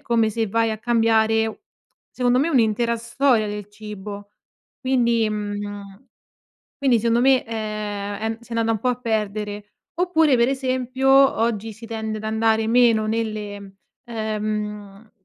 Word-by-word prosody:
come 230 Hz, -2 st, +1 dB
se 225 Hz, +1 st, -1 dB
vai 225 Hz, +2 st, +1 dB
a 215 Hz, -, -3 dB
cambiare 225 Hz, -1 st, +2 dB
u -, -, -9 dB, 0.5 s
secondo 250 Hz, 0 st, +1 dB
me, 290 Hz, +5 st, +2 dB
un'intera 235 Hz, -3 st, +2 dB
storia 235 Hz, -1 st, +1 dB
del 205 Hz, -1 st, -6 dB
cibo, 205 Hz, -1 st, -9 dB, 0.5 s
quindi 235 Hz, -4 st, +2 dB
mhmm, 205 Hz, +1 st, -6 dB, 0.7 s
quindi 260 Hz, -4 st, +3 dB
secondo 230 Hz, +1 st, +2 dB
me, 265 Hz, +1 st, +4 dB
ehm, 215 Hz, -2 st, -4 dB
è 220 Hz, +2 st, -2 dB
mhmm, 225 Hz, -, -4 dB
s'è 235 Hz, 0 st, -10 dB
andata 230 Hz, 0 st, +1 dB
un 220 Hz, -, -1 dB
po' 250 Hz, -, -2 dB
a 250 Hz, -, +2 dB
perdere. 210 Hz, -3 st, -3 dB, 0.2 s
Oppure, 320 Hz, -6 st, +3 dB
per 235 Hz, +1 st, +4 dB
esempio, 260 Hz, 0 st, -1 dB
oggi 230 Hz, -5 st, +3 dB
si 225 Hz, +2 st, -11 dB
tende 220 Hz, -1 st, -4 dB
ad 215 Hz, -, -10 dB
andare 220 Hz, 0 st, +1 dB
meno 230 Hz, -2 st, +4 dB
nelle 210 Hz, -3 st, -4 dB, 0.3 s
ehm, 215 Hz, -2 st, -4 dB
225 Hz, 145 wpm, -22 LUFS, 210-240 Hz, 0.7 s, me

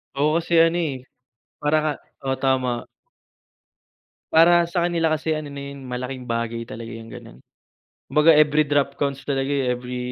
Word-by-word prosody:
Oo 145 Hz, +2 st, +2 dB
kasi 170 Hz, 0 st, -1 dB
ano, 165 Hz, +1 st, +2 dB
eh, 140 Hz, -7 st, -3 dB, 0.6 s
para 150 Hz, +1 st, +2 dB
ka 155 Hz, -, +1 dB, 0.3 s
oo 135 Hz, -, 0 dB
tama. 130 Hz, -3 st, 0 dB, 1.5 s
Para 170 Hz, +1 st, +6 dB
sa 170 Hz, 0 st, 0 dB
kanila 165 Hz, -2 st, +1 dB
kasi 155 Hz, +1 st, -1 dB
ano 150 Hz, -1 st, -6 dB
na 140 Hz, -, -7 dB
yun 135 Hz, -1 st, -10 dB
malaking 125 Hz, +1 st, -5 dB
bagay 115 Hz, -1 st, -3 dB
talaga 115 Hz, 0 st, -8 dB
yung 115 Hz, 0 st, -9 dB
gano'n. -, -, -11 dB, 0.7 s
Kumbaga, 150 Hz, +2 st, +5 dB
every 150 Hz, 0 st, +4 dB
drop 145 Hz, -1 st, +1 dB
counts 140 Hz, -1 st, -2 dB
talaga, 135 Hz, -1 st, -1 dB
eh, 140 Hz, -2 st, 0 dB
every 125 Hz, 0 st, -6 dB
140 Hz, 160 wpm, -23 LUFS, 125-155 Hz, 1.5 s, Para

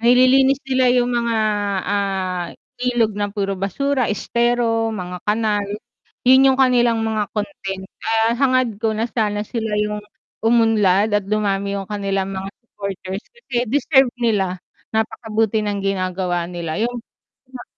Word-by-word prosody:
Nililinis 255 Hz, +3 st, +5 dB
nila 260 Hz, -1 st, +1 dB
'yong 245 Hz, -1 st, +2 dB
mga, 235 Hz, -1 st, 0 dB, 0.5 s
ah, 190 Hz, -3 st, -1 dB, 0.3 s
ilog 240 Hz, -3 st, +1 dB
na 205 Hz, -1 st, -2 dB
puro 195 Hz, -2 st, -2 dB
basura, 255 Hz, +7 st, 0 dB
estero, 230 Hz, 0 st, 0 dB
mga 180 Hz, -2 st, -5 dB
kanal. 210 Hz, -1 st, +1 dB, 0.6 s
'Yon 260 Hz, +2 st, +6 dB
'yong 265 Hz, -1 st, +3 dB
kanilang 240 Hz, -3 st, +3 dB
mga 220 Hz, -2 st, 0 dB
content. 195 Hz, -4 st, -4 dB, 0.2 s
Ah, 225 Hz, 0 st, +2 dB
hangad 255 Hz, -5 st, +2 dB
ko 220 Hz, -1 st, 0 dB
na 225 Hz, +2 st, -2 dB
sana 210 Hz, -2 st, 0 dB
sila 220 Hz, -1 st, -3 dB
'yong 210 Hz, 0 st, -1 dB, 0.4 s
umunlad 220 Hz, -3 st, +3 dB
at 195 Hz, -, -9 dB
dumami 200 Hz, -1 st, 0 dB
'yong 195 Hz, 0 st, -5 dB
kanilang 195 Hz, -2 st, -1 dB
mga 190 Hz, 0 st, -5 dB, 0.2 s
supporters, 195 Hz, -3 st, -6 dB
kasi 255 Hz, -, -3 dB
deserve 265 Hz, +1 st, +3 dB
nila. 195 Hz, -5 st, 0 dB, 0.3 s
Napakabuti 220 Hz, -1 st, 0 dB
ng 200 Hz, -1 st, -2 dB
ginagawa 185 Hz, -2 st, -1 dB
nila 170 Hz, -2 st, -4 dB
'yong 235 Hz, +3 st, -1 dB, 0.5 s
ima 255 Hz, -1 st, -10 dB
220 Hz, 135 wpm, -20 LUFS, 195-240 Hz, 0.6 s, Yon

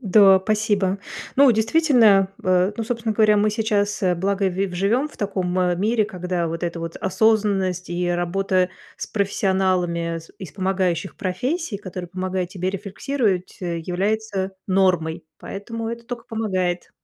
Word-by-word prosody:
Да, 195 Hz, -3 st, +6 dB
спасибо. 205 Hz, -2 st, +1 dB, 0.4 s
Ну, 275 Hz, -1 st, +7 dB
действительно, 220 Hz, -5 st, +4 dB, 0.2 s
э, 185 Hz, +2 st, +3 dB
ну, 230 Hz, -, -2 dB
собственно 230 Hz, -2 st, -2 dB
говоря, 215 Hz, -1 st, +4 dB
мы 210 Hz, +1 st, +3 dB
сейчас, 205 Hz, -1 st, 0 dB
э, 180 Hz, -1 st, +3 dB
благо 195 Hz, +2 st, 0 dB
ви 190 Hz, +2 st, -1 dB
в 180 Hz, -, -8 dB
живем 230 Hz, +11 st, +1 dB
в -, -, -17 dB
таком 185 Hz, -3 st, -2 dB, 0.2 s
мире, 215 Hz, +1 st, +2 dB
когда 180 Hz, -3 st, -3 dB
вот 165 Hz, +1 st, -4 dB
эта 170 Hz, -1 st, -2 dB
вот 165 Hz, 0 st, -5 dB
осознанность 195 Hz, -3 st, +1 dB
и 175 Hz, 0 st, -1 dB
работа 180 Hz, +1 st, +1 dB, 0.3 s
с -, -, -5 dB
профессионалами, 185 Hz, -4 st, 0 dB
с 165 Hz, -, -14 dB
из 185 Hz, -6 st, -8 dB
помогающих 190 Hz, -2 st, -1 dB
профессий, 240 Hz, -, -2 dB
которые 185 Hz, -3 st, -7 dB
помогают 185 Hz, 0 st, -3 dB
тебе 185 Hz, 0 st, -2 dB
рефлексировать, 200 Hz, 0 st, -2 dB
э, 170 Hz, -2 st, -2 dB
является 195 Hz, +2 st, -2 dB
нормой. 180 Hz, -4 st, +1 dB
Поэтому 225 Hz, +3 st, -6 dB
это 235 Hz, 0 st, -6 dB
тока 235 Hz, -1 st, -6 dB
помогает. 185 Hz, -6 st, -2 dB
195 Hz, 150 wpm, -22 LUFS, 180-215 Hz, 0.4 s, Ну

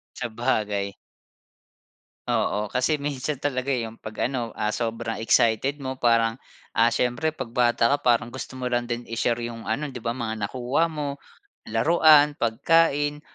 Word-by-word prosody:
Sabagay. 105 Hz, -4 st, -1 dB, 1.3 s
Oo. 105 Hz, +1 st, 0 dB
Kasi 130 Hz, +7 st, 0 dB
minsan 140 Hz, 0 st, -3 dB
talaga, 135 Hz, -1 st, -1 dB
eh, 120 Hz, -3 st, 0 dB
'yong 110 Hz, -, -13 dB
pag, 110 Hz, +1 st, -2 dB
ano, 125 Hz, -3 st, -3 dB
ah, 105 Hz, 0 st, -1 dB
sobrang 115 Hz, -1 st, -3 dB
excited 120 Hz, +6 st, +2 dB
mo 130 Hz, -1 st, -4 dB
parang, 115 Hz, -2 st, +2 dB, 0.4 s
ah, -, -, +4 dB
siyempre 125 Hz, +5 st, 0 dB
'pag 130 Hz, -6 st, -7 dB
bata 120 Hz, -1 st, +3 dB
ka -, -, -4 dB
parang 120 Hz, 0 st, +3 dB
gusto 130 Hz, 0 st, -7 dB
mo 125 Hz, -, -2 dB
lang 120 Hz, -1 st, -1 dB
din 120 Hz, 0 st, -4 dB
i-share 115 Hz, +1 st, 0 dB
'yong 115 Hz, -1 st, -6 dB
ano, 150 Hz, +2 st, -1 dB
'di 125 Hz, -3 st, -8 dB
ba, 115 Hz, -, 0 dB
mga 110 Hz, -4 st, -3 dB
nakuha 130 Hz, +6 st, 0 dB
mo, 145 Hz, -2 st, -3 dB, 0.5 s
laruan, 150 Hz, +4 st, +5 dB
pagkain, 145 Hz, +4 st, +2 dB
120 Hz, 155 wpm, -25 LUFS, 115-140 Hz, 1.3 s, laruan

